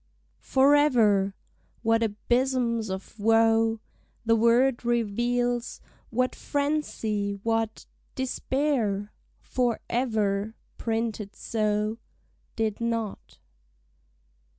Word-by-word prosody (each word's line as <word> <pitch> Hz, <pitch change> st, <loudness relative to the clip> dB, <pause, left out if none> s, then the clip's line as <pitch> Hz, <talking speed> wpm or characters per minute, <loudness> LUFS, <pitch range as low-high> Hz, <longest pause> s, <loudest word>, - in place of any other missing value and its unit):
Forever! 250 Hz, -9 st, +4 dB, 0.5 s
What 225 Hz, 0 st, +3 dB
abysms 235 Hz, +1 st, 0 dB
of 190 Hz, +3 st, -7 dB
woe 225 Hz, +1 st, +3 dB, 0.5 s
The 230 Hz, 0 st, +4 dB
word 235 Hz, +3 st, +3 dB
reveals, 240 Hz, +1 st, 0 dB, 0.3 s
what 255 Hz, +2 st, 0 dB
frenzy, 280 Hz, -9 st, -1 dB
what 225 Hz, -1 st, -1 dB, 0.3 s
Despair! 255 Hz, -6 st, -1 dB, 0.3 s
For 245 Hz, -3 st, 0 dB
ever 220 Hz, -3 st, 0 dB, 0.2 s
(printed 225 Hz, -3 st, -2 dB
so) 215 Hz, 0 st, -1 dB, 0.6 s
Did 220 Hz, -1 st, -1 dB
not. 230 Hz, -3 st, -3 dB
225 Hz, 75 wpm, -27 LUFS, 215-245 Hz, 0.6 s, Forever